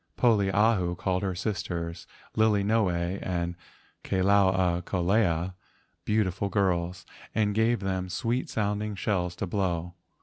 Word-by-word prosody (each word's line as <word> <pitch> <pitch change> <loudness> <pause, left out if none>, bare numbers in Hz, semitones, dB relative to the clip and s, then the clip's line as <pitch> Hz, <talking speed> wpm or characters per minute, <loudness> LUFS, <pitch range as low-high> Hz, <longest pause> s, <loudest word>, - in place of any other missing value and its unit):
Poliahu 100 -5 +3
called 90 0 0
her 95 -2 -2
sisters, 85 -3 -3 0.3
Lilinoe 100 -4 +2
and 85 -1 -2 0.5
Ka - - -2
lau 95 +1 +4
a 90 -2 +1
kolea, 90 -1 +1 0.5
beautiful 100 -2 0
girls, 90 -3 0 0.3
and 105 -1 +2
gave 110 +2 +2
them 95 -1 -2
sweet 120 +7 -1
sounding 105 0 -1
shells 90 -2 -1
to 100 - -3
blow. 90 -3 -1
95 Hz, 115 wpm, -28 LUFS, 90-105 Hz, 0.5 s, lau